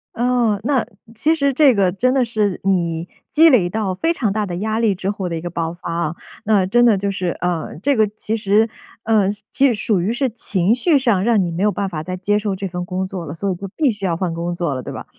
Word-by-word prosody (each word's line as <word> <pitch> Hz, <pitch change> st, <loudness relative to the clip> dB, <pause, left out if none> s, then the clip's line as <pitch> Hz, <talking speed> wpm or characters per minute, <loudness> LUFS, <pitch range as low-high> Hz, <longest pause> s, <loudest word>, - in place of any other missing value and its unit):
哦， 240 Hz, -4 st, +1 dB
那 270 Hz, -5 st, +1 dB, 0.3 s
其 300 Hz, +9 st, +2 dB
实 280 Hz, -3 st, +1 dB
这 275 Hz, -1 st, +5 dB
个 190 Hz, -3 st, +2 dB
真 255 Hz, +7 st, +1 dB
的 265 Hz, -2 st, +3 dB
是， 215 Hz, -4 st, -1 dB
你 170 Hz, -3 st, 0 dB, 0.2 s
积 320 Hz, +2 st, +6 dB
累 215 Hz, -, +4 dB
到 195 Hz, -1 st, -2 dB
非 330 Hz, -, 0 dB
常 225 Hz, -11 st, -1 dB
大 210 Hz, 0 st, -1 dB
的 175 Hz, -2 st, -5 dB
压 220 Hz, +3 st, -2 dB
力 225 Hz, -3 st, +2 dB
之 190 Hz, +1 st, -4 dB
后 195 Hz, -2 st, -3 dB
的 170 Hz, -, -3 dB
一 160 Hz, -, -4 dB
个 175 Hz, -, -5 dB
爆 165 Hz, -1 st, -3 dB
发 175 Hz, -1 st, -7 dB
啊， 170 Hz, -1 st, -2 dB, 0.3 s
那 210 Hz, -3 st, +3 dB
真 240 Hz, +4 st, +4 dB
的 225 Hz, -3 st, +5 dB
就 200 Hz, +1 st, -2 dB
是， 185 Hz, -3 st, -2 dB
呃， 175 Hz, -3 st, -2 dB
这 280 Hz, 0 st, +2 dB
个 215 Hz, -1 st, +3 dB
其 215 Hz, +1 st, -3 dB
实， 215 Hz, +2 st, +2 dB, 0.3 s
呃， 215 Hz, -3 st, +2 dB, 0.2 s
其 275 Hz, -, +2 dB
实 255 Hz, -, +4 dB
属 210 Hz, -2 st, 0 dB
于 200 Hz, +6 st, 0 dB
是 260 Hz, +1 st, 0 dB
情 205 Hz, -3 st, +1 dB
绪 290 Hz, +2 st, +3 dB
上， 220 Hz, -8 st, +1 dB
让 225 Hz, -3 st, +3 dB
你 175 Hz, -, -2 dB
没 170 Hz, +4 st, -2 dB
有 210 Hz, -, +3 dB
办 200 Hz, -1 st, -3 dB
法 155 Hz, -4 st, -5 dB
再 185 Hz, +2 st, -4 dB
接 205 Hz, +3 st, 0 dB
受 205 Hz, -2 st, -2 dB
这 195 Hz, +1 st, -4 dB
份 180 Hz, 0 st, -5 dB
工 185 Hz, +1 st, -3 dB
作 185 Hz, -3 st, -6 dB
了， 145 Hz, -, -6 dB
所 195 Hz, +4 st, -2 dB
以 180 Hz, -, -2 dB
就 195 Hz, +2 st, -7 dB
必 290 Hz, -6 st, +2 dB
须 205 Hz, -2 st, -6 dB
要 170 Hz, -, 0 dB
换 175 Hz, 0 st, -2 dB
工 170 Hz, +1 st, -3 dB
作 170 Hz, -5 st, -2 dB
了， 130 Hz, -, -5 dB
对 -, -, -7 dB
吧？ -, -, -7 dB
200 Hz, 285 characters per minute, -19 LUFS, 180-230 Hz, 0.3 s, 积